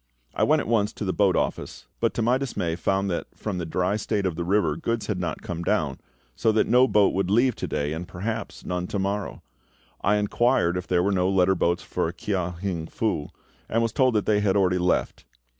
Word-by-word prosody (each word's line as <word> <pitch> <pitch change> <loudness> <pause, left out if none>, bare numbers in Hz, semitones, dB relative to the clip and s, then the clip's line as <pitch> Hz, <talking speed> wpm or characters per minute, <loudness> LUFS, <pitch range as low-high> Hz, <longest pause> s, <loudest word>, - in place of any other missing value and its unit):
I - - -3
went 155 0 +4
at - - -6
once 110 -2 +1
to 105 - -5
the 95 - 0
boat 100 -3 +3
office, - - -2
but - - 0
to 115 - 0
my 125 +3 +3
dismay 90 -11 -2
found 95 +3 0
that 85 - -3
from 100 -4 -4
the 85 - -4
dry 90 +5 0
state 105 -2 -1
of 90 -3 -1
the 85 - -3
river 90 -4 +1
goods 115 +7 -2
had 105 -4 -2
not 90 - -3
come 85 -1 -4
down, 80 -8 0 0.4
so 110 - +2
that 110 - +3
no 125 +3 +5
boat 105 -5 +3
would 95 -1 0
leave 120 +3 +3
to - - -3
day 75 +1 -2
and 85 +2 -5
perhaps 110 +4 -5
none 90 0 -2
to - - -3
morrow. 100 +1 -3 0.6
I 100 +2 +3
inquired 105 -3 +2
if 90 0 -4
there 90 -1 +2
were 100 - +1
no 90 -1 +2
letter 95 -1 +3
boats 85 -1 0
for 80 - -2
Kia 90 -1 -2
hing 85 -4 -3
Fu, 100 -9 -2 0.4
and 115 +1 +1
was 115 - 0
told 130 -3 +3
that 105 - +1
they 105 -1 +3
had 100 -1 +2
already 90 -2 +2
left. 90 -7 0
95 Hz, 225 wpm, -25 LUFS, 90-110 Hz, 0.6 s, no